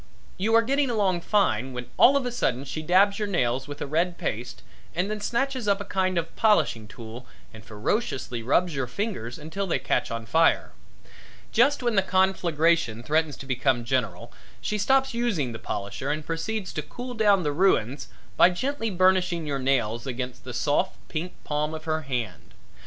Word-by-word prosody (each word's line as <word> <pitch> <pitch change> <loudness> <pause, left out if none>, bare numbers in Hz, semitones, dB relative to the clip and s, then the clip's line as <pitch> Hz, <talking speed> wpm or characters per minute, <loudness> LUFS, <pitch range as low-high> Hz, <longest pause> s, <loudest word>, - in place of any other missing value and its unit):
You 220 +4 +1
are 230 - +6
getting 275 +3 +1
along 195 -6 +1
fine, 135 - +1
when 125 0 -5
all 275 +3 +6
of 270 - -1
a 245 - -2
sudden 135 - -1
she 155 - -4
dabs 195 +6 +3
your 210 - -1
nails 130 -8 0
with 145 0 -8
a - - -3
red 170 +5 0
paste 120 +3 -4 0.3
and 180 +5 0
then 215 -1 -4
snatches 255 +1 -1
up 200 0 +3
a 205 - -5
kind 185 -1 0
of 165 - +1
a - - -23
polishing 205 - +2
tool 115 +2 -10 0.3
and 110 0 -12
ferociously 120 - -2
rubs 165 +9 +2
your 135 -3 -2
fingers 125 - -4
until 175 +6 -4
they 170 - +1
catch 135 - 0
on 115 0 -4
fire. 160 +8 +3 0.8
Just 265 +4 +3
when 240 -1 +1
the 200 - +4
conflagration 170 - +1
threatens 155 +1 0
to - - -9
become 130 -2 0
general 115 -8 -2 0.3
she 210 - -2
stops 265 +5 +2
using 220 - 0
the 110 - -7
polisher 100 +7 -4
and 150 +1 -2
proceeds 185 +4 -3
to 155 - -2
cool 245 - -7
down 205 -5 +3
the 150 - 0
ruins 145 - +1 0.3
by - - +7
gently 225 +5 -2
burnishing 185 -3 +2
your 140 -2 -2
nails 120 -3 0
against 125 0 -5
the 130 - -6
soft, 150 +8 0
pink 170 +3 -4
palm 150 +1 -1
of 155 - -8
her 160 0 -1
hand. 125 -9 -5
165 Hz, 185 wpm, -26 LUFS, 130-205 Hz, 0.8 s, by